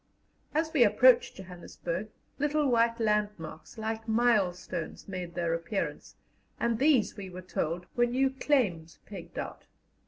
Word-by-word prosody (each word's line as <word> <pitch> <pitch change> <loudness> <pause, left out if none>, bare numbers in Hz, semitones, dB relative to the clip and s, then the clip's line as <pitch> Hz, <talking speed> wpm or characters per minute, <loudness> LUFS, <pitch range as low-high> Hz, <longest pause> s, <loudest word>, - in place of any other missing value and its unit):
As 320 +1 0
we 275 -6 +6
approached 235 +3 +5
Johannesburg, 180 +1 -6 0.3
little 295 +1 +2
white 230 -2 +3
landmarks 210 -7 -2
like 220 +1 -4
milestones 195 -7 0
made 180 -3 -6
their 170 -2 0
appearance, 170 +5 -3 0.4
and 235 -1 0
these, 275 -5 +3
we 200 -3 -7
were 185 0 -9
told, 175 0 -2
were 240 0 +3
new 260 +2 +2
claims 210 - 0
pegged 195 -5 -10
out. - - -6
210 Hz, 130 wpm, -29 LUFS, 180-240 Hz, 0.4 s, we